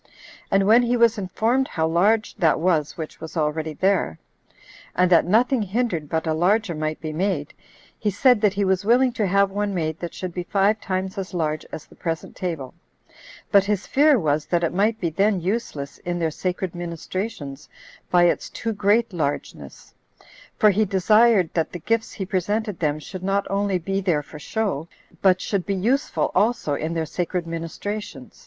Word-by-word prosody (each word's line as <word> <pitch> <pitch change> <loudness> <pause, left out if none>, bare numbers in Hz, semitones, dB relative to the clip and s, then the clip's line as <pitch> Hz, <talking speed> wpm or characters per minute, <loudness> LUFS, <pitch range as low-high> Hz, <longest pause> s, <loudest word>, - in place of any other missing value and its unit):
And 195 0 +3
when 225 +4 +6
he 245 0 +1
was 230 -2 +4
informed 225 +8 0
how 160 0 -1
large 205 +7 +2
that 165 -3 +3
was 160 -4 +1
which 160 -2 -7
was 160 +2 -7
already 155 0 -1
there, 185 - +1 0.8
and 180 0 +3
that 170 - +6
nothing 235 +5 +3
hindered 200 -7 -1
but 160 +2 -1
a 160 - +1
larger 185 +4 +2
might 155 0 -3
be 155 -1 -5
made, 170 -4 -1 0.5
he 210 - 0
said 225 +3 +3
that 205 -2 +2
he 200 0 +1
was 190 0 +1
willing 245 +3 +3
to 215 -5 0
have 200 +1 +3
one 205 0 -2
made 160 -2 -2
that 175 - -6
should 185 -2 -5
be 180 - -3
five 200 +4 +1
times 190 +1 -3
as 185 -1 -6
large 155 -2 -2
as 155 - -7
the - - -19
present 165 -2 -4
table; 160 -8 -4 0.8
but 200 -1 +5
his 205 -1 -1
fear 290 0 +4
was, 155 -5 0
that 175 -1 +1
it 165 - 0
might 215 +4 +1
be 170 -5 -1
then 200 +3 +2
useless 170 -7 -3
in 175 0 -3
their 165 -2 0
sacred 185 +2 -3
ministrations 170 -3 -5 0.4
by 175 -1 +4
its 175 - +1
too 225 -1 -3
great 210 +2 +2
largeness; 145 -4 -4 0.6
for 215 - +5
he 210 +3 +2
desired 210 0 +4
that 165 -2 0
the - - -3
gifts 225 +7 -1
he 195 - -4
presented 205 +1 -1
them 150 -2 0
should 180 +5 -8
not 195 +1 0
only 200 -1 +1
be 195 +3 -2
there 170 -6 +1
for 150 - -11
show, 185 -3 -2 0.3
but 185 -2 +4
should 195 -1 -1
be 200 - -2
useful 245 +10 0
also 215 -9 +1
in 155 +3 -2
their 165 -1 -1
sacred 175 +2 -3
ministrations. 165 -2 -6
185 Hz, 185 wpm, -23 LUFS, 165-210 Hz, 0.8 s, when